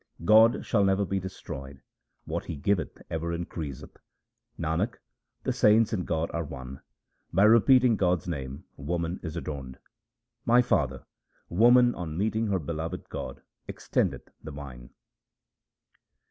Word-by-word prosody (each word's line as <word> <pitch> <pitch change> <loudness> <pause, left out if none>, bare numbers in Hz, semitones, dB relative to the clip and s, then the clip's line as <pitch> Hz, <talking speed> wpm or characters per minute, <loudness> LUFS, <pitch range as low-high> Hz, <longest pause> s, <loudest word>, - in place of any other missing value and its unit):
God 110 +3 +6
shall 100 -4 +2
never 95 +1 +2
be 95 +1 -1
destroyed; 70 -7 -8 0.4
what - - -3
He - - -5
giveth 90 +6 -1
ever 85 +1 -2
increaseth. 80 -5 -6 0.6
Nanak, 85 +8 -1 0.5
the - - 0
saints 110 +2 +4
and 90 -4 -2
God 80 0 -1
are 85 - -2
one; 65 -2 -8 0.5
by 95 +4 +3
repeating 115 +2 +6
God's 90 -2 +1
name 70 -5 -5
woman 85 +4 -3
is 80 -2 -6
adorned. 70 -5 -6 0.7
My 120 +1 +5
father, 70 - 0 0.4
woman 120 +6 +5
on 80 -3 -5
meeting 110 +3 0
her 100 -2 +1
beloved 80 0 -5
God - - -6 0.3
extendeth - - -1
the 80 - -8
vine. 70 -5 -9
85 Hz, 130 wpm, -28 LUFS, 75-105 Hz, 0.7 s, God